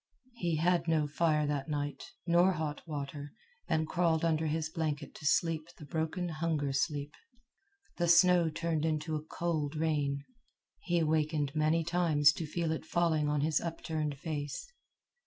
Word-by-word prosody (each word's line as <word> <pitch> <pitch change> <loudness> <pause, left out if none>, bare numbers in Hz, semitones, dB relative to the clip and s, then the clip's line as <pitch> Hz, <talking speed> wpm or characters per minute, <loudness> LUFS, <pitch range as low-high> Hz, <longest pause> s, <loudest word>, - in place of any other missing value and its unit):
He 170 -5 0
had 170 +1 +2
no 160 -2 +2
fire 150 0 +1
that 145 0 -2
night, 145 -1 -2 0.2
nor 175 +2 +4
hot 155 -3 -3
water, 145 -1 -5 0.3
and 160 0 +1
crawled 170 -2 +1
under 160 -1 +1
his 160 +1 -1
blanket 155 -3 -3
to 150 - -5
sleep 165 0 +1
the 150 - -10
broken 165 +3 -2
hunger 155 -3 -1
sleep. 145 +2 -1 0.8
The 175 - +1
snow 175 0 +6
turned 160 -1 -1
into 155 0 -1
a 150 - -2
cold 160 -2 -2
rain. 145 -3 0 0.6
He 175 -1 0
awakened 155 -2 +1
many 155 +2 +2
times 160 -3 +4
to 160 - -5
feel 165 +1 -1
it 160 - -3
falling 160 -2 +1
on 150 -1 +1
his 155 0 +1
upturned 155 -3 -3
face. 145 - -4
155 Hz, 155 wpm, -32 LUFS, 150-165 Hz, 0.8 s, snow